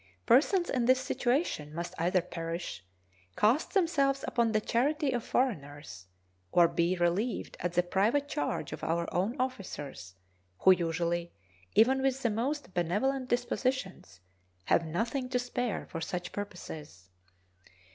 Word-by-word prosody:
Persons 345 - +4
in 250 -3 0
this 255 +1 +5
situation 245 - -1
must 170 +1 -4
either 180 +2 +2
perish, 165 - -5 0.5
cast 240 - +2
themselves 280 -7 +2
upon 235 -2 +2
the 215 - +3
charity 280 +7 +1
of 240 -2 -1
foreigners, 145 - -2 0.4
or 175 -1 +6
be 170 +2 +1
relieved 180 +7 0
at 175 0 -2
the 175 0 +3
private 215 +11 +1
charge 145 - -2
of - - -8
our 170 +1 0
own 210 +9 0
officers, 150 - -4 0.5
who 190 - +8
usually, 170 0 0 0.4
even 260 +5 +5
with 270 0 0
the 235 - +2
most 255 +1 -2
benevolent 250 +10 0
dispositions, 245 - -2 0.4
have - - +3
nothing 230 - -2
to 250 - +1
spare 245 -2 -2
for 165 - -6
such 175 +1 -4
purposes. 150 - -8
205 Hz, 135 wpm, -30 LUFS, 170-255 Hz, 0.5 s, who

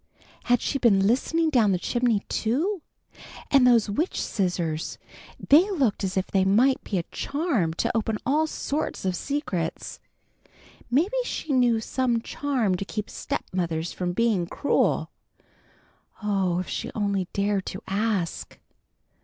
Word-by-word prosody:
Had 245 -1 +3
she 275 - -1
been 195 -6 +4
listening 315 +8 +2
down 220 -8 +4
the - - +2
chimney, 240 +2 +1
too? 315 - -1 0.7
And 270 -3 +6
those 235 -3 +5
witch 295 - -1
scissors! 175 -5 -2 0.4
They 330 +8 +5
looked 270 - 0
as 190 0 -2
if 190 - +1
they 190 -1 +1
might 235 +8 +3
be 200 - -2
a 170 - 0
charm 275 - -1
to 235 +6 -1
open 225 -1 0
all 305 +4 +2
sorts 300 -7 -3
of 185 -1 0
secrets. 190 - -3 0.9
Maybe 340 - +2
she 320 - -3
knew 245 -3 +3
some 240 +1 0
charm 245 -4 -1
to 195 - -3
keep 210 +1 -5
stepmothers 170 -2 -3
from 180 -1 -2
being 210 -4 +1
cruel. 285 - +1 1.1
Oh, 195 -4 +1
if 185 - -3
she - - -4
only 200 -3 0
dared 200 -1 0
to 185 - -6
ask! 195 -4 -2
220 Hz, 140 wpm, -25 LUFS, 190-270 Hz, 1.1 s, And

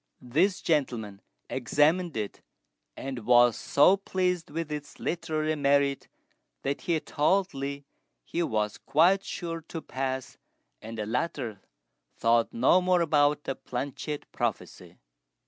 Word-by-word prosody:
This 170 +11 +1
gentleman 115 -10 -1 0.3
examined 150 +5 +1
it, 105 -2 -4 0.6
and 135 -2 -5
was 120 0 +5
so 165 +7 +4
pleased 180 -3 -1
with 160 +1 -4
its 150 -1 -6
literary 155 -2 -1
merit 140 -1 +2 0.6
that 140 +1 -2
he 170 -2 0
told 185 +7 +1
Li 140 +1 -5 0.4
he 170 - -3
was 105 -9 -1
quite 185 +6 +3
sure 165 -2 -5
to 165 - -5
pass, 130 -3 -4 0.4
and 115 +1 -8
the 105 - -2
latter 115 - -3 0.6
thought 115 0 +3
no 135 +10 +4
more 180 -1 +3
about 150 -2 +3
the 135 - -2
planchette 140 +4 -5
prophecy. - - -4
145 Hz, 125 wpm, -28 LUFS, 125-165 Hz, 0.6 s, was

